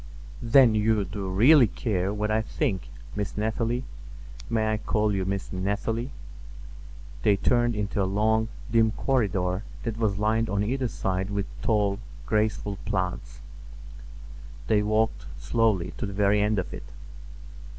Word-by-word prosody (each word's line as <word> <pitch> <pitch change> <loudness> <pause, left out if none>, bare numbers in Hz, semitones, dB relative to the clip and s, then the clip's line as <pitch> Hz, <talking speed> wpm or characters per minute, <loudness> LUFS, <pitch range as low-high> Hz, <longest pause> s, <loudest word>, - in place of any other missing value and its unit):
"Then 120 0 +6
you 105 -1 +2
do 95 0 -5
really 120 +7 +6
care 100 -4 -2
what 105 +1 -2
I 110 +1 +2
think, 95 -3 -2 0.3
Miss 105 -1 -4
Nathalie? 115 +3 -1 0.7
May 110 -2 +1
I - - 0
call 105 0 0
you 95 -1 -1
Miss 100 +1 -3
Nathalie?" 105 +6 -2 1.1
They 100 -2 +3
turned 120 +2 +2
into 105 0 -1
a - - +2
long, 110 +2 +2 0.2
dim 110 -1 +3
corridor 100 -6 0 0.2
that 115 -2 -3
was 105 -4 +1
lined 110 +2 +1
on 100 0 0
either 130 +4 -1
side 95 -3 -2
with 100 -1 -1 0.2
tall, 105 -2 +1 0.3
graceful 105 -2 0
plants. 90 -2 -3 1.2
They 105 -1 +3
walked 110 +2 0
slowly 105 - +1
to 110 - -3
the 100 - -6
very 105 0 +3
end 105 +1 +1
of 95 - -3
it. - - -7
105 Hz, 140 wpm, -26 LUFS, 100-110 Hz, 1.2 s, Then